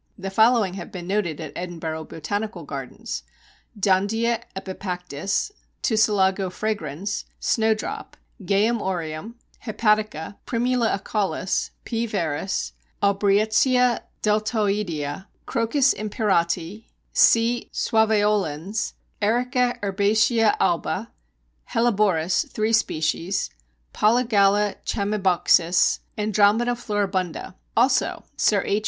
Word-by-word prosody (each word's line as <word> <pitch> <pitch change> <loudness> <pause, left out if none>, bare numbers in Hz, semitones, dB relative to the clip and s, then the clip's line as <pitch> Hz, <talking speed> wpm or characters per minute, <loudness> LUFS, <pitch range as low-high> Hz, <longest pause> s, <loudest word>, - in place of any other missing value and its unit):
The 195 0 -5
following 220 -2 +4
have 185 -3 -7
been 180 -2 -7
noted 185 -5 -1
at - - -7
Edinburgh 165 -3 -5
Botanical 205 +8 -4
Gardens: - - -6 0.6
Dondia 220 +5 +1
epipactis, 185 - -3 0.3
Tussilago 195 -4 +2
fragrans, 200 -2 -3
Snowdrop, 220 -1 -1 0.3
Geum 205 +5 +2
aureum, 175 +3 -4 0.3
Hepatica, 215 -5 0
Primula 240 -2 +1
acaulis, 195 -2 -1 0.2
P. 235 0 -2
veris, 190 -3 -2 0.3
Aubrietia 215 +5 +3 0.2
deltoidea, 205 -7 -1 0.2
Crocus 255 +4 +2
imperati, 200 -2 -1 0.3
C. 235 +1 +4
suaveolens, 210 -4 +1 0.3
Erica 245 +3 +1
herbacea 210 +3 +3
alba, 170 - 0 0.6
Helleborus 205 -6 +2
(3 215 +1 0
species), 165 - 0 0.4
Polygala 210 -3 +3
chamaebuxus, 190 -4 +2 0.2
Andromeda 215 +3 +3
floribunda; 200 -8 -2 0.2
also 250 +3 +2
Sir 205 -2 +2
H. 205 - +1
205 Hz, 85 wpm, -23 LUFS, 185-225 Hz, 0.6 s, following